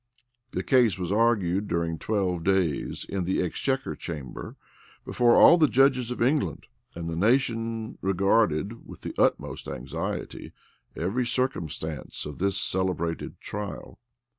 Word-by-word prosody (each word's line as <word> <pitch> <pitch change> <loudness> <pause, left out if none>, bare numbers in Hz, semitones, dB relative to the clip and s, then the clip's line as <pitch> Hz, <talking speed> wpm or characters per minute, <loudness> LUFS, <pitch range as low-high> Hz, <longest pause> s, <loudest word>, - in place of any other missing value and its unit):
The - - -2
case 120 -8 +4
was 90 -1 -3
argued 105 -3 +2
during 85 -1 -1
twelve 95 -5 -1
days, 90 -7 0
in 95 -2 -2
the 95 +2 0
exchequer 135 +9 -2
chamber, 75 -7 -7 0.5
before 120 -1 +3
all 170 - +8
the 155 - +6
judges 130 -2 +3
of 125 -1 -1
England; 140 +4 0 0.3
and 85 -1 -5
the 80 - -3
nation 115 +2 0
regarded, 95 +1 +1
with - - -11
the - - -5
utmost - - +1
anxiety, 65 +3 -5 0.4
every 115 +9 -1
circumstance 80 - -2
of 75 -1 -7
this 100 +1 +1
celebrated 90 -4 -2
trial. 105 -1 -7
100 Hz, 130 wpm, -27 LUFS, 85-120 Hz, 0.5 s, all